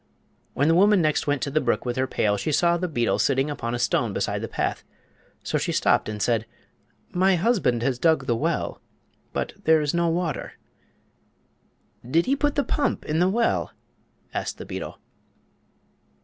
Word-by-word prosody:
When 145 - +2
the 165 - +4
woman 200 +3 +5
next 155 -3 +1
went 145 -1 0
to 140 - -2
the 155 +2 +1
brook - - 0
with 120 -1 -2
her 130 0 0
pail 105 -4 +1
she 130 +9 -2
saw 170 +3 +3
the 180 +1 -2
beetle 120 -8 0
sitting 135 +2 +1
upon 120 -4 -3
a - - -1
stone 120 -3 0
beside - - -1
her - - -3
path. - - -2 0.6
So - - -1
she - - -1
stopped - - +2
and 105 -1 -5
said: 115 0 0 0.6
"My 185 +1 +3
husband 170 - +1
has 125 -1 0
dug 160 -3 +2
the 120 -2 +1
well; 115 - -2 0.5
but - - -3
there 160 0 +5
is 150 -2 -1
no 170 0 +2
water." 170 -1 -2 1.5
"Did 160 +8 +1
he 275 - +2
put 290 0 0
the 285 - +2
pump 290 - -1
in 155 +1 0
the 180 +1 +3
well?" 230 +4 0 0.6
asked - - -3
the - - -8
beetle. - - -6
155 Hz, 180 wpm, -24 LUFS, 125-180 Hz, 1.5 s, woman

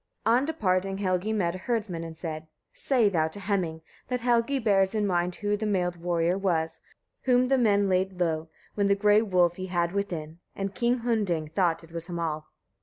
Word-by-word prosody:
On 240 +5 +4
departing 195 - 0
Helgi 185 +1 0
met 185 -6 0
a - - -5
herdsman, 205 -6 -2
and 165 -1 -8
said: 155 -2 -4
1. 160 - -27 0.3
"Say 250 -6 +2
thou 165 -5 +2
to 160 +6 -6
Heming, 185 -5 -1 0.3
that 250 -1 -2
Helgi 240 +3 +2
bears 200 -4 +2
in 210 -1 +1
mind 175 -2 0
who 205 -1 -1
the 215 +1 -2
mailed 180 -3 0
warrior 170 +1 0
was, 165 -4 -1 0.4
whom 250 0 +3
the 270 - +4
men 205 -4 +3
laid 185 0 0
low, 160 -2 0 0.2
when 200 -1 +1
the 200 - +4
grey 210 +1 +4
wolf 180 -4 +2
ye 185 - -4
had 175 -2 0
within, 170 -5 -4 0.2
and 195 0 -3
King 240 +2 +1
Hunding 200 -10 0
thought 170 0 +1
it 165 - -15
was 165 0 -6
Hamal." 165 -3 -3
190 Hz, 195 wpm, -27 LUFS, 170-210 Hz, 0.4 s, On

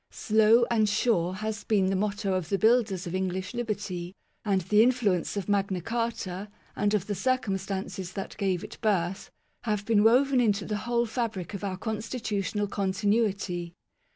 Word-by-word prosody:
" - - -52 0.2
Slow 220 +2 +6
and 215 -3 +3
sure 200 -5 +1
" 215 - -5
has 220 -1 -3
been 195 -3 +2
the - - +1
motto 200 0 -1
of 185 -3 -2
the 195 - +1
builders 220 -4 +2
of 170 - -5
English 185 +1 -2
liberty; 200 -6 -4 0.3
and 195 -4 +1
the 210 +5 +4
influence 225 -7 +2
of 195 - -3
Magna 200 -2 +1
Carta, 225 -2 -3 0.3
and 205 +1 +1
of 195 -3 -1
the 205 - -2
circumstances 195 -4 -2
that 195 - -5
gave 190 -4 0
it - - -9
birth, 190 -3 0 0.4
have 210 -2 -1
been 210 -2 +3
woven 255 +3 +5
into 205 -4 +1
the 210 - -2
whole 235 0 +2
fabric 220 -6 -3
of 200 - -6
our 190 -2 -2
constitutional 215 -2 -2
continuity. 195 -3 -1
205 Hz, 170 wpm, -28 LUFS, 190-220 Hz, 0.4 s, Slow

